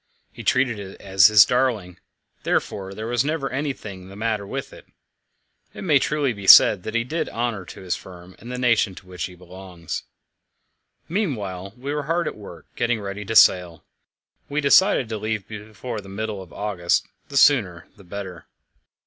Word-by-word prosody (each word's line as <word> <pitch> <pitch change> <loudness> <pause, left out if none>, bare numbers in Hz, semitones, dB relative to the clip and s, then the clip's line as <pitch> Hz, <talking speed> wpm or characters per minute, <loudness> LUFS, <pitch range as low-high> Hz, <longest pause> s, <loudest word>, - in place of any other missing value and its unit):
He - - -10
treated 125 -4 +1
it 95 -1 -9
as 95 -2 +5
his 105 -1 +7
darling; 110 -9 -1 0.4
therefore 95 -1 -2
there 110 - -6
was 120 +1 +1
never 150 -3 -2
anything 115 -9 -5
the 100 - -11
matter 105 -1 -2
with - - -6
it. - - -15 0.9
It - - -7
may 150 -7 +4
truly 145 -3 0
be 100 -2 -9
said 95 - +9
that 110 +5 -6
he 115 - +2
did 160 +7 -3
honour 115 -5 -3
to - - -11
his 90 -2 -2
firm 90 0 -13
and 120 - -9
the 125 - -4
nation 115 -6 +2
to - - -13
which 90 -1 -5
he 90 - -10
belongs. 90 -1 -8 1.1
Meanwhile 105 - -3
we 140 +3 -4
were 150 - -1
hard 170 0 +1
at - - -4
work, 100 -5 -12
getting 120 -1 0
ready 100 0 -6
to 110 - -4
sail. 90 -6 +4 0.6
We 145 +1 -1
decided 145 - +4
to 110 -2 -4
leave 110 -1 -3
before 110 +2 -7
the 95 - -13
middle 105 0 -4
of 90 - -13
August 95 -5 -1 0.2
the 140 - -3
sooner 100 - +3
the 100 - -17
better. 95 -2 -8
105 Hz, 180 wpm, -23 LUFS, 95-125 Hz, 1.1 s, said